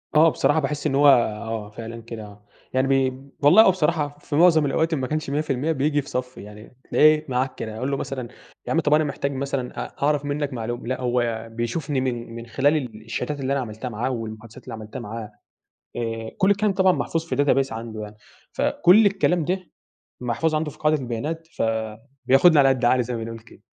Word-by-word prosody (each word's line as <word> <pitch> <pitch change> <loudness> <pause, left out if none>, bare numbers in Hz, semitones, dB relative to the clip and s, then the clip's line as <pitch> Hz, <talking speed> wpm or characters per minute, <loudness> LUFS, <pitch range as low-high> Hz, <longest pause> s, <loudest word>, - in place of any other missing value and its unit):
آه. 160 +2 +7
بصراحة 155 0 +2
باحس 150 0 -2
إن 135 - -1
هو 145 +1 +5
آه، 110 -3 +1
فعلًا 115 +2 -8
كده 115 -1 -8
آه. 105 0 -15 0.3
يعني 130 +1 +2
بي 135 -1 +1 0.2
والله 165 +10 +8
هو 190 - +6
بصراحة 150 -4 -1
في 145 - -5
معظم 160 -2 +5
الأوقات 160 +4 +1
إن 150 - 0
ما 130 - -2
كانش 155 0 -3
100% 145 +1 -1
بييجي 145 0 +1
في 140 - -12
صفّي، 125 -2 -4
يعني 105 +3 -13
تلاقيه 155 0 +5
معاك 130 +1 -1
كده. 110 0 -6
أقول 130 +4 -2
له 140 - 0
مثلًا 130 -3 -4 0.4
يا - - -2
عم 165 - +3
طب 150 -2 +2
أنا 155 +1 +4
محتاج 140 -1 -2
مثلًا 135 -2 -3
أ - - -13
أعرف 145 0 +1
منّك 145 -1 -2
معلوم 120 0 -4
لأ 130 +1 -2
هو 120 -2 -1
بيشوفني 130 +5 -2
من 120 -3 -3
من 115 - -7
خلال 135 +6 +2
ال 115 -6 -6
الشاتات 125 +5 -3
اللي 135 0 -1
أنا 140 - 0
عملتها 110 +2 -6
معاه 115 +3 -2
والمحادثات 110 -1 -7
اللي 125 - -8
عملتها 110 +3 -7
معاه. 110 -1 -7 0.7
آآ 115 -1 -3
كل 190 - +3
الكلام 200 0 +2
طبعًا 190 -1 +4
محفوظ 165 -2 -2
في 165 - -3
database 135 -2 +2
عنده 110 -1 -6
يعني. 105 0 -9 0.4
فكل 200 +5 +4
الكلام 185 -4 +2
ده 185 +2 -3 0.5
محفوظ 125 +7 0
عنده 155 -1 -1
في - - -17
قاعدة 155 0 +2
البيانات، 150 +7 -4
فبياخُدني 125 +8 +2
على 135 -1 +6
قد 130 -2 +1
عقلي 125 +1 +4
زي 120 +1 -4
ما 115 - -4
بنقول 115 0 -7
كده. 115 0 -19
130 Hz, 205 wpm, -23 LUFS, 115-150 Hz, 0.7 s, والله